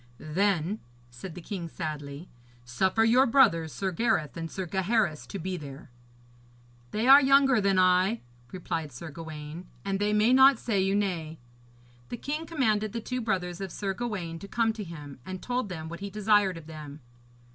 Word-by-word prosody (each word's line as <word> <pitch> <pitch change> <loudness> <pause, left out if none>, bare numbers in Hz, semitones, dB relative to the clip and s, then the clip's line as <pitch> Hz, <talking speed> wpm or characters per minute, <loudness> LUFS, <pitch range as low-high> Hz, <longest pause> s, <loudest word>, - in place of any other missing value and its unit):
'Then,' 185 - 0 0.3
said 155 +8 -9
the 180 - -8
king 175 -4 -5
sadly, 150 0 -6 0.4
'suffer 190 - +1
your 250 +4 +5
brothers, 165 - +4
Sir 190 +4 -2
Gareth 180 -6 0
and 165 -1 -5
Sir 190 +2 -4
Gaheris, 190 -2 0
to - - -6
be 185 +1 -3
there.' 140 -4 -10 1.0
'They 220 - -1
are 275 +2 +10
younger 270 -3 +5
than 195 -1 +2
I,' 185 +4 +3 0.3
replied 165 -4 -4
Sir 150 +6 -8
Gawaine, 160 +2 -8 0.2
'and 195 -1 -1
they 205 +1 +1
may 210 +4 +4
not 265 0 +7
say 215 -4 0
you 195 +1 +1
nay.' 170 -6 -2 0.7
The 240 - -5
king 300 +6 -4
commanded 215 -10 0
the 235 - -2
two 250 +2 -4
brothers 185 -5 -2
of 190 -2 -5
Sir 195 +1 -3
Gawaine 190 -8 -4
to 200 - -9
come 225 +1 +1
to 220 -1 -6
him, 150 -6 -9
and 185 +4 -6
told 245 -2 -2
them 160 -3 -6
what 170 +1 -7
he 200 0 -5
desired 205 -2 +2
of 165 - -11
them. 155 -2 -9
190 Hz, 180 wpm, -28 LUFS, 165-220 Hz, 1.0 s, are